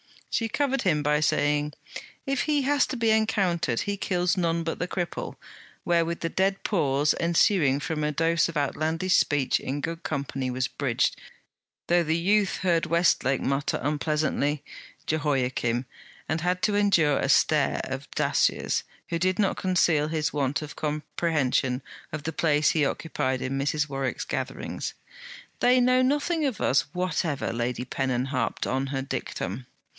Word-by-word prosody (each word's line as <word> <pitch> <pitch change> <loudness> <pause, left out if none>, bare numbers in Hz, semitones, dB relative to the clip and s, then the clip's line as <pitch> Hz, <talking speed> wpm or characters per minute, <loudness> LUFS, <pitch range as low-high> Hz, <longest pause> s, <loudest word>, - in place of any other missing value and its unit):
She 230 - 0
covered 270 +2 0
him 155 -6 +2
by 150 0 +2
saying: 150 0 +1 0.5
'If 275 -2 0
he 295 -2 +1
has 285 0 +2
to - - -4
be 230 -1 +2
encountered, 190 - +1
he 200 0 -2
kills 180 -2 0
none 170 -2 0
but 165 - -3
the 180 - -1
cripple,' 175 -1 -4 0.5
wherewith 170 -1 +1
the 165 - -1
dead 195 +3 0
pause 145 -6 +2
ensuing 170 -4 +3
from 150 0 -3
a 150 - +1
dose 165 +3 +2
of 165 - -4
outlandish 160 +5 0
speech 145 -3 +2
in 140 +2 -4
good 165 +2 -4
company 135 -3 -3
was 130 +1 -1
bridged, 130 -3 0 0.7
though 175 0 +4
the 160 0 0
youth 200 +3 +2
heard 170 -3 +1
Westlake 160 -6 +2
mutter 140 +1 0
unpleasantly: 150 0 0 0.4
'Jehoiachim,' 130 -5 0 0.4
and 160 +1 -1
had 180 +1 -1
to 210 - +2
endure 170 -8 +3
a - - -1
stare - - +3
of - - -6
Dacier's, - - +1 0.3
who 170 - -1
did 185 +1 +1
not 200 -3 +1
conceal 170 -5 +2
his 155 -1 -1
want 145 +1 0
of 145 -1 -8
comprehension 150 -4 -1 0.3
of 155 -1 -5
the 160 - -3
place 150 -1 +2
he 155 -3 +2
occupied 130 -4 -2
in 135 +1 -2
Mrs. 150 +2 0
Warwick's 135 -2 -3
gatherings. - - -4 0.6
'They 250 +1 +4
know 255 +1 +4
nothing 295 +4 +1
of 255 -8 -2
us 135 - +2
whatever!' 180 -7 -1
Lady 120 +1 -2
Pennon 130 -1 -1
harped 130 -4 -1
on 135 +2 -1
her 135 -1 -2
dictum. 125 -3 -4
155 Hz, 155 wpm, -26 LUFS, 140-180 Hz, 0.7 s, though